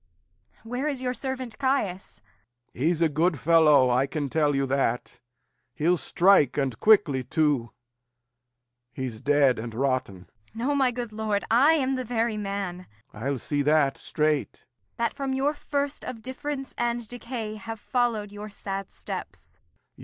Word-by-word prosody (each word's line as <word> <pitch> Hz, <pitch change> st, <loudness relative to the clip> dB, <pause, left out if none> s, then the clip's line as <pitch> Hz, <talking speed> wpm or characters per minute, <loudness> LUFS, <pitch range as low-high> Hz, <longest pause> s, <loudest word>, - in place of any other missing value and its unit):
Where 245 Hz, +5 st, -3 dB
is 280 Hz, -4 st, -2 dB
your 250 Hz, -1 st, -1 dB
servant 260 Hz, -1 st, -4 dB
Caius? 240 Hz, -, -1 dB, 0.5 s
Lear. 125 Hz, -, -5 dB
He's 170 Hz, -1 st, +1 dB
a -, -, +5 dB
good 155 Hz, +1 st, +1 dB
fellow, 150 Hz, -6 st, +5 dB
I 130 Hz, +3 st, +2 dB
can 145 Hz, -2 st, -3 dB
tell 150 Hz, -3 st, +2 dB
you 135 Hz, 0 st, +1 dB
that. 135 Hz, -2 st, -1 dB, 0.6 s
He'll 165 Hz, +6 st, +2 dB
strike, 170 Hz, -6 st, +3 dB
and 130 Hz, -5 st, -1 dB
quickly 180 Hz, -12 st, +4 dB
too. 145 Hz, -5 st, +1 dB, 1.2 s
He's 120 Hz, -3 st, -5 dB
dead 145 Hz, -4 st, +3 dB
and 115 Hz, 0 st, -6 dB
rotten. 130 Hz, -7 st, -1 dB
Kent. 90 Hz, -, -19 dB, 0.3 s
No, 250 Hz, +6 st, 0 dB
my 270 Hz, -2 st, +4 dB
good 240 Hz, -2 st, -5 dB
lord; 215 Hz, -2 st, -1 dB
I 270 Hz, +8 st, +6 dB
am 270 Hz, -4 st, +1 dB
the 255 Hz, -, -2 dB
very 230 Hz, -1 st, -1 dB
man 195 Hz, -3 st, -4 dB, 0.3 s
Lear. 110 Hz, +4 st, -8 dB
I'll 140 Hz, -1 st, 0 dB
see 145 Hz, +3 st, -1 dB
that 145 Hz, -1 st, +3 dB
straight. 150 Hz, -1 st, 0 dB
Kent. 100 Hz, -6 st, -28 dB
That 235 Hz, -1 st, 0 dB
from 275 Hz, -1 st, -3 dB
your 275 Hz, +3 st, +1 dB
first 285 Hz, -1 st, -3 dB
of 225 Hz, -3 st, -7 dB
difference 270 Hz, +1 st, -5 dB
and 240 Hz, -1 st, -1 dB
decay 235 Hz, -2 st, -5 dB
Have 225 Hz, 0 st, -7 dB
followed 230 Hz, -4 st, 0 dB
your 205 Hz, +1 st, -8 dB
sad 195 Hz, -1 st, -6 dB
steps. -, -, -7 dB
195 Hz, 160 wpm, -26 LUFS, -, 1.2 s, I